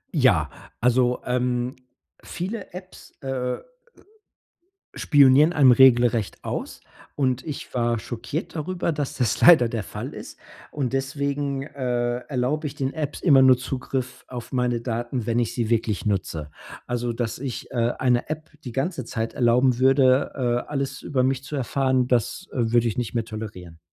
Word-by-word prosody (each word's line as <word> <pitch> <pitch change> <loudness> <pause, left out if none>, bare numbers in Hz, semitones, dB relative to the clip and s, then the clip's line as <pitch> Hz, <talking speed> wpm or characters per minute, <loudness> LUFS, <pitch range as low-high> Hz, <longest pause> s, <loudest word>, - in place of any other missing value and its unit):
Ja, - - +3 0.3
also, 125 +1 +2
ähm, 125 0 -1 0.5
viele 195 +4 -5
Apps, 185 0 -11
äh 130 -2 -2 1.4
spionieren 145 +2 +5
einem 135 -5 +6
regelrecht 120 -4 +4
aus. - - -5 0.3
Und 130 -3 0
ich 150 - -6
war 120 -2 +1
schockiert 120 - -5
darüber, 170 +2 -2
dass 145 -3 -3
das 125 -3 0
leider 155 -9 +7
der 115 -3 -3
Fall - - -7
ist. - - -10 0.3
Und 135 -3 -3
deswegen, 140 0 -2
äh, 125 -4 -2
erlaube 140 +4 -2
ich 140 - -3
den 135 -2 -2
Apps 150 -2 -4
immer 140 -7 +6
nur 130 -1 +7
Zugriff 130 0 -4
auf 120 -2 -8
meine 125 -2 0
Daten, 120 0 -3
wenn 115 0 0
ich 120 -1 0
sie 120 -2 -2
wirklich 115 -3 0
nutze. 85 -7 -2 0.4
Also, 120 -1 -2
dass 115 -1 -3
ich, 130 -2 -6
äh, 120 -1 +1
eine 125 +1 +1
App 155 +1 -5
die 125 - -6
ganze 135 0 -2
Zeit 115 -1 -3
erlauben 125 -1 +3
würde, 130 0 +4
äh, 120 -2 -1
alles 140 -1 -3
über 130 -3 0
mich 130 0 0
zu 145 - -6
erfahren. 130 -1 +1
Das, 125 - 0
äh, 115 -3 -1
würde 120 -1 +3
ich 110 - -3
nicht 120 -2 -3
mehr 115 -2 -1
tolerieren. 100 -7 -8
125 Hz, 160 wpm, -24 LUFS, 120-140 Hz, 1.4 s, leider